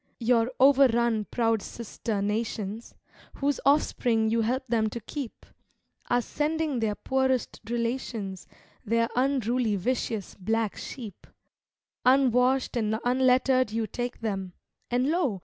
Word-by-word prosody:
Your 235 Hz, 0 st, +2 dB
overrun 240 Hz, -5 st, +4 dB
proud 225 Hz, -3 st, +1 dB
sister 220 Hz, -2 st, -4 dB
nations, 215 Hz, 0 st, -3 dB, 0.4 s
Whose 285 Hz, -1 st, 0 dB
offspring 240 Hz, -6 st, +2 dB
you 230 Hz, 0 st, +2 dB
help 255 Hz, +4 st, -1 dB
them 225 Hz, -2 st, +1 dB
to 235 Hz, -, -5 dB
keep, 250 Hz, +2 st, -7 dB, 0.6 s
Are 245 Hz, 0 st, +2 dB
sending 300 Hz, -1 st, -1 dB
their 215 Hz, -2 st, 0 dB
poorest 265 Hz, -1 st, 0 dB
relations, 230 Hz, -5 st, -3 dB, 0.4 s
Their 230 Hz, +2 st, +1 dB
unruly 250 Hz, -4 st, +1 dB
vicious 220 Hz, 0 st, -2 dB
black 220 Hz, +2 st, -1 dB
sheep; 220 Hz, -8 st, -8 dB, 0.8 s
Unwashed 255 Hz, 0 st, +3 dB
and 220 Hz, -2 st, 0 dB
unlettered 255 Hz, 0 st, +3 dB
you 225 Hz, +1 st, -1 dB
take 245 Hz, +2 st, -5 dB
them, 195 Hz, -5 st, -3 dB, 0.4 s
And 250 Hz, +3 st, +1 dB
lo! 280 Hz, -, 0 dB
235 Hz, 115 wpm, -27 LUFS, 220-260 Hz, 0.8 s, overrun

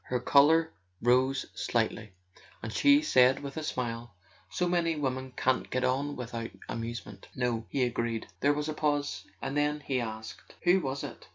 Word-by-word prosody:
Her 125 Hz, -, -1 dB
colour 155 Hz, +6 st, +5 dB, 0.3 s
rose 130 Hz, +3 st, +2 dB
slightly, 110 Hz, -2 st, -1 dB, 0.5 s
and 110 Hz, -1 st, -5 dB
she 285 Hz, +1 st, +5 dB
said 130 Hz, -, +4 dB
with 140 Hz, -1 st, -6 dB
a 160 Hz, -, -3 dB
smile: 120 Hz, -7 st, -4 dB, 0.3 s
"So 180 Hz, -, 0 dB
many 170 Hz, -2 st, +1 dB
women 130 Hz, -3 st, -2 dB
can't 130 Hz, 0 st, +1 dB
get 130 Hz, 0 st, -1 dB
on 140 Hz, +3 st, 0 dB
with¬ 125 Hz, -1 st, -6 dB
out 115 Hz, -1 st, -3 dB, 0.2 s
amusement." 115 Hz, -3 st, -6 dB
"No," 120 Hz, -3 st, -1 dB
he 135 Hz, -, 0 dB
agreed. 115 Hz, -2 st, -1 dB
There 145 Hz, -, +3 dB
was 150 Hz, +1 st, -2 dB
a 155 Hz, -, -2 dB
pause, 145 Hz, -1 st, -1 dB, 0.2 s
and 135 Hz, -, -3 dB
then 150 Hz, 0 st, +1 dB
he 130 Hz, -3 st, -1 dB
asked: 110 Hz, -1 st, -7 dB
"Who 180 Hz, +2 st, +5 dB
was 135 Hz, -4 st, -3 dB
it?" -, -, -8 dB
130 Hz, 175 wpm, -30 LUFS, 120-150 Hz, 0.5 s, colour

